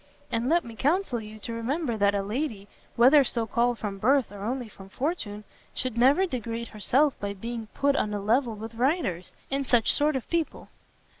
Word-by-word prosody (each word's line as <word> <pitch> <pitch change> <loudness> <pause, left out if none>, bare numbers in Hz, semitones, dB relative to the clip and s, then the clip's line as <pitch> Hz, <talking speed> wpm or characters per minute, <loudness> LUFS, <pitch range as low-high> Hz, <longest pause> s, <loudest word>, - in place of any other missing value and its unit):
And 230 +2 0
let 340 +2 +3
me 230 -1 -9
counsel 290 - +1
you 215 0 -10
to 230 +2 -6
remember 245 +3 -1
that 205 -1 +2
a 200 - 0
lady, 215 -2 -3 0.3
whether 270 +5 +7
so 235 -2 0
called 235 +2 +1
from 200 -3 -5
birth 260 +2 +3
or 205 -1 -9
only 245 +2 -2
from 195 -2 -14
fortune, 220 - -3 0.3
should 255 -3 -2
never 270 +10 +4
degrade 235 - -4
herself 265 +7 +2
by 200 0 -4
being 230 +2 -5
put 280 0 +2
on 210 - 0
a 205 - -2
level 230 +3 +1
with 220 +2 -8
writers, 235 - 0 0.2
and 275 +1 0
such 245 -4 +3
sort 295 0 +2
of 260 - -3
people." 335 -2 -2
235 Hz, 195 wpm, -27 LUFS, 215-275 Hz, 0.3 s, whether